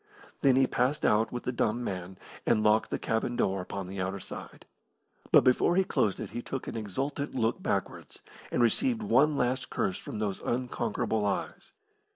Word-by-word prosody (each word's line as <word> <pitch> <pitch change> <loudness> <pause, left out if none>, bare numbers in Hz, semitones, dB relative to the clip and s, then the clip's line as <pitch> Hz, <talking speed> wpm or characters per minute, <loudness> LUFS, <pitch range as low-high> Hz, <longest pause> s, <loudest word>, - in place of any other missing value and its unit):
Then 135 -2 +5
he 135 0 +5
passed 130 +4 0
out 110 +1 +3
with 120 - -4
the - - -1
dumb 120 0 0
man, 95 -2 -5 0.3
and 110 - +2
locked 110 +1 +3
the - - -1
cabin 115 +2 -1
door 95 -4 +1
upon 95 +1 -5
the 95 0 -5
outer 95 +2 -2
side. - - -9 0.7
But - - +7
before 130 +7 +3
he 190 - +4
closed 105 - 0
it - - -6
he 120 - -4
took 135 +2 -5
an - - -5
exultant 135 +8 -3
look 115 -2 0
backwards, - - -3 0.3
and 120 - +2
received 230 - +2
one 150 -7 +4
last 125 +2 0
curse 95 - -1
from - - -7
those 105 -3 -2
unconquerable 120 -3 -1
eyes. 100 -1 -3
120 Hz, 185 wpm, -29 LUFS, 105-130 Hz, 0.7 s, But